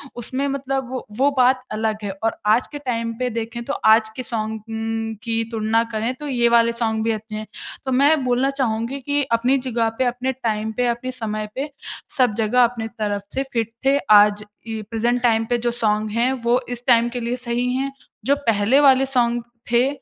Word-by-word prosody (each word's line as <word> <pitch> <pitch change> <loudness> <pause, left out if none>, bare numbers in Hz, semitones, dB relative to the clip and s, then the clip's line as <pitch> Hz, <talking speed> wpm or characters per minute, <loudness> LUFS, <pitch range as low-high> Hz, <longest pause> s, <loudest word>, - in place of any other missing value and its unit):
उसमें 255 +4 -3
मतलब 270 -2 -2
वो 255 0 -5
वो 275 +3 +4
बात 255 0 +4
अलग 215 0 -1
है 200 - -2
और 225 - +1
आज 225 +4 +3
के 295 - -5
टाइम 230 -4 -2
पे 250 0 0
देखें 230 +1 -4
तो 280 - -2
आज 220 0 +6
के 255 - -4
सॉन्ग्स 220 -2 -4
उम, 225 0 -3
की 230 0 0
तुलना 225 0 +1
करें 220 +3 -1
तो 295 +3 -7
ये 240 -4 +2
वाले 235 0 +4
सॉन्ग 225 -2 -1
भी 225 - +1
अच्छे 215 0 -5
हैं। 215 0 -5 0.4
तो 265 - -1
मैं 280 +3 +4
बोलना 250 +2 +2
चाहूँगी 235 +2 -1
कि 285 +2 0
अपनी 245 +4 +3
जगह 240 -3 0
पे, 260 - +2
अपने 245 +2 -1
टाइम 220 -4 -2
पे, 250 0 +2
अपने 240 +2 -2
समय 215 -4 -4
पे 280 +3 -3 0.5
सब 250 -5 +3
जगह 230 +3 +3
अपनी 230 -2 0
तरफ 205 -2 -3
से 270 - 0
फिट 230 -2 -1
थे। 275 +1 +4 0.2
आज 210 0 +2 0.2
इ 220 -1 -4
प्रेजेंट 235 +2 0
टाइम 225 -2 +3
पे 240 - +2
जो - - +2
सॉन्ग 215 -2 0
हैं 245 +3 +3
वो 240 +2 +4
इस 245 -1 -5
टाइम 240 -1 +5
के 245 +1 -4
लिए 235 +1 -2
सही 245 +1 0
हैं। 270 +2 -1 0.3
जो 280 +3 +4
पहले 225 +4 +4
वाले 270 -2 +5
सॉन्ग 240 0 +2 0.3
थे, 240 +2 +4
235 Hz, 205 wpm, -21 LUFS, 225-255 Hz, 0.5 s, आज